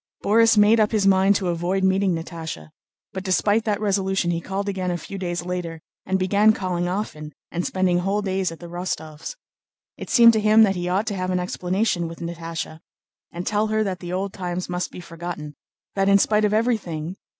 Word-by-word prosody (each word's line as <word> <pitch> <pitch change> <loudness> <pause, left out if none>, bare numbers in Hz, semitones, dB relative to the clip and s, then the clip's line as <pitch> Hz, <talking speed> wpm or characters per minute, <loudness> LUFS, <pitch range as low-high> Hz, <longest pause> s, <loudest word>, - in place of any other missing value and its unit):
Borís 225 +1 +4
made 210 +2 +6
up 215 -1 +3
his 215 -3 +1
mind 195 +1 +4
to 185 -3 0
avoid 175 +3 -1
meeting 190 -1 +2
Natásha, 160 - -6 0.4
but 190 - -5
despite 205 +3 +2
that 210 -2 0
resolution 195 -3 0
he 170 0 -2
called 195 +3 -4
again 190 -2 -2
a 175 - -1
few 195 +4 -8
days 175 -2 -3
later 175 -2 -4 0.3
and 190 0 +1
began 200 +3 +4
calling 180 -3 -2
often 165 -6 -4 0.2
and 175 +1 -2
spending 185 -2 +1
whole 195 +3 -1
days 190 -2 -1
at 165 - -10
the 175 - -10
Rostóvs'. 170 - -5 0.6
It - - -8
seemed 235 -2 +7
to 220 - +2
him 215 +1 +6
that 195 -3 +3
he 175 0 -3
ought 195 +4 +1
to 205 - -2
have 185 -1 -2
an 180 -1 +1
explanation 180 0 -1
with 165 0 -8
Natásha 165 -1 -6 0.5
and 175 +1 -6
tell 210 +1 +1
her 215 0 +1
that 190 -3 -3
the 175 -1 -7
old 190 +2 -2
times 180 -1 -4
must 180 0 -3
be - - -9
forgotten, 165 -3 -7 0.4
that 195 0 +1
in 200 - +7
spite 210 +1 +2
of 210 - +1
everything... 190 -7 -1
185 Hz, 205 wpm, -23 LUFS, 175-205 Hz, 0.6 s, seemed